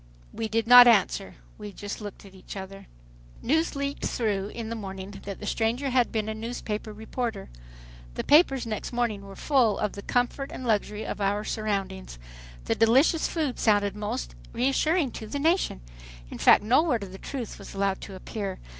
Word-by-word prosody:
We 225 - -3
did 225 +1 0
not 245 +1 +10
answer. 200 -3 +3 0.2
We 210 -2 -8 0.2
looked 205 -1 -9
at 195 - -14
each 190 +1 -10
other. 195 +1 -9 0.6
News 315 +5 +1
leaked 280 0 -3
through 205 -4 -1
in 225 +1 -6
the 230 - -3
morning 195 -2 -7
that 200 -1 -6
the - - -7
stranger 235 +6 0
had 245 -1 +2
been 215 -1 -1
a 220 - -2
newspaper 220 -1 -5
reporter. 220 0 -5 0.6
The - - -2
papers 275 -5 +4
next 215 -2 -4
morning 235 -4 -1
were 195 0 -11
full 250 -7 +2
of 210 - -1
the 200 - -8
"comfort" 245 +5 -1
and 255 - -7
"luxury" 210 -1 0
of - - -5
our 200 +1 +1
surroundings. 195 - -3 0.5
The - - +1
"delicious" 265 +8 +4
food 305 -6 -2
sounded 205 -2 +2
most 135 - -4 0.2
reassuring 275 +4 +1
to 220 - -7
the 285 - -4
nation. 320 - +1 0.5
In - - -7
fact - - +6
no 245 +7 +4
word 250 -10 0
of 190 - -8
the 190 - -10
truth 250 -6 -6
was 200 - -10
allowed 195 -1 0
to 195 - -8
appear. 195 0 -5
220 Hz, 180 wpm, -27 LUFS, 200-245 Hz, 0.6 s, not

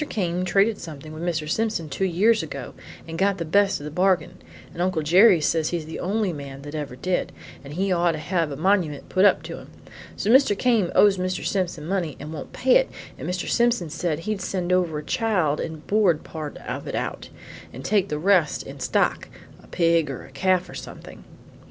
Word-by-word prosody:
Came 180 -3 -1
traded 200 +4 +2
something 155 -2 -9
with 155 - -8
Mr. 165 -3 -2
Simpson 215 -2 -1
two 190 - -2
years 205 +6 +3
ago - - -7 0.3
and 165 0 -6
got 195 0 +2
the 170 - -3
best 200 +4 +2
of - - -9
the 150 - -6
bargain, 180 +1 +1 0.4
and 170 - -5
Uncle 180 -3 0
Jerry 180 +4 +6
says 155 +1 +1
he's 170 -3 -3
the 160 - -7
only 200 0 0
man 140 -2 -8
that 145 +1 -8
ever 145 -5 -5
did, 180 +7 -1 0.3
and 140 +1 -9
he 195 +2 0
ought 175 -1 +2
to - - -4
have 165 +1 -1
a - - -4
monument 165 -3 0
put 185 +1 +3
up - - +4
to - - -7
him. - - -13 0.5
So 210 - +1
Mr. 255 -6 +5
Came 230 -7 +2
owes 200 -2 +5
Mr. 185 0 -2
Simpson 180 -5 -1
money 175 -4 -2
and 150 +2 -7
won't 150 - -7
pay 260 - +4
it, - - 0 0.3
and - - -4
Mr. 180 0 -3
Simpson 235 -9 +1
said 165 -1 -2
he'd 210 +2 -3
send 180 -1 -1
over 175 -4 +1
a 150 - -5
child 180 -6 0
and 155 -2 -6
board 200 -7 +2
part 155 -2 -7
of - - -6
it - - -3
out, - - -4 0.4
and - - -9
take 200 -2 +2
the 150 - -2
rest 175 -1 +2
in 135 +1 -10
stock 125 -1 0 0.3
a - - -18
pig 165 -3 +2
or 135 - -6
a - - -16
calf 185 -1 +1
or - - -11
something." - - -10
175 Hz, 215 wpm, -24 LUFS, 155-195 Hz, 0.5 s, Jerry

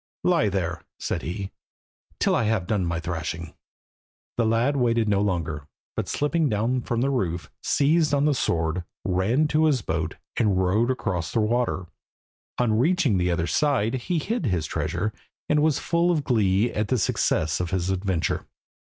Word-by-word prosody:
"Lie 170 - +3
there," 85 -4 -2 0.2
said - - -2
he, 95 +4 -5 0.7
"till - - +2
I 115 - +1
have 105 -4 +1
done 95 -3 0
my 85 0 -1
thrashing." 80 -1 -4 0.8
The 115 -2 +1
lad 115 +6 +2
waited 115 -4 +2
no 100 -1 +2
longer, 80 -7 -2 0.3
but - - -2
slipping 150 +1 +1
down 115 +4 0
from 120 0 -1
the 135 +2 +1
roof 90 -9 -2
seized 155 +1 +2
on 145 0 +2
the 150 - +3
sword, 85 - 0 0.2
ran 100 +11 +2
to 155 +1 +3
his 135 -8 +2
boat, 80 -1 -2 0.2
and 105 -5 +2
rowed 95 +6 +2
across 90 - -2
the - - +1
water. 115 -3 0 0.7
On 110 -3 +2
reaching 145 - +2
the 90 0 +1
other 85 -1 0
side 130 - +1
he 130 +7 -1
hid 190 - -1
his 90 -6 0
treasure, 105 +7 -2 0.3
and 150 0 +3
was 155 -2 +3
full 170 +4 +1
of 160 -4 +1
glee 105 -2 +2
at 105 0 -1
the 130 - +1
success 80 -6 +1
of 90 -1 -2
his 95 0 -1
adventure. 95 -2 -1
110 Hz, 170 wpm, -25 LUFS, 90-135 Hz, 0.8 s, Lie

